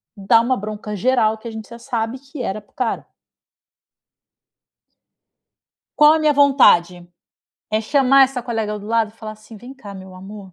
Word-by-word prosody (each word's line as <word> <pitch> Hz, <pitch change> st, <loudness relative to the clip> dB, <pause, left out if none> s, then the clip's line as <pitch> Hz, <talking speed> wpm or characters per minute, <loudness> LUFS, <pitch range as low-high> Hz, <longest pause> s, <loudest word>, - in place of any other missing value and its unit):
dar 200 Hz, +2 st, +3 dB
uma 255 Hz, +2 st, -1 dB
bronca 210 Hz, +1 st, -7 dB
geral 220 Hz, 0 st, +1 dB
que 220 Hz, -, -11 dB
a -, -, -6 dB
gente 220 Hz, -1 st, -9 dB
já 235 Hz, 0 st, -11 dB
sabe 230 Hz, +1 st, -4 dB
que 275 Hz, +1 st, -10 dB
era 215 Hz, -2 st, -4 dB
para 205 Hz, -, -32 dB
o -, -, -46 dB
cara. 250 Hz, -3 st, -3 dB, 2.9 s
Qual 300 Hz, 0 st, +7 dB
a 320 Hz, -, +2 dB
minha 305 Hz, -1 st, +3 dB
vontade? 180 Hz, -12 st, +3 dB, 0.6 s
É 215 Hz, -, +1 dB
chamar 270 Hz, +3 st, +4 dB
essa 260 Hz, -1 st, -5 dB
colega 220 Hz, -3 st, -4 dB
do 205 Hz, -, -11 dB
lado 225 Hz, 0 st, 0 dB
e 215 Hz, -, -21 dB
falar 220 Hz, -1 st, -8 dB
assim: 215 Hz, +1 st, -15 dB
"Vem 245 Hz, +5 st, -12 dB
cá 210 Hz, -7 st, -12 dB
meu 190 Hz, -1 st, -12 dB
amor. 195 Hz, +1 st, -12 dB
225 Hz, 175 wpm, -19 LUFS, 210-255 Hz, 2.9 s, Qual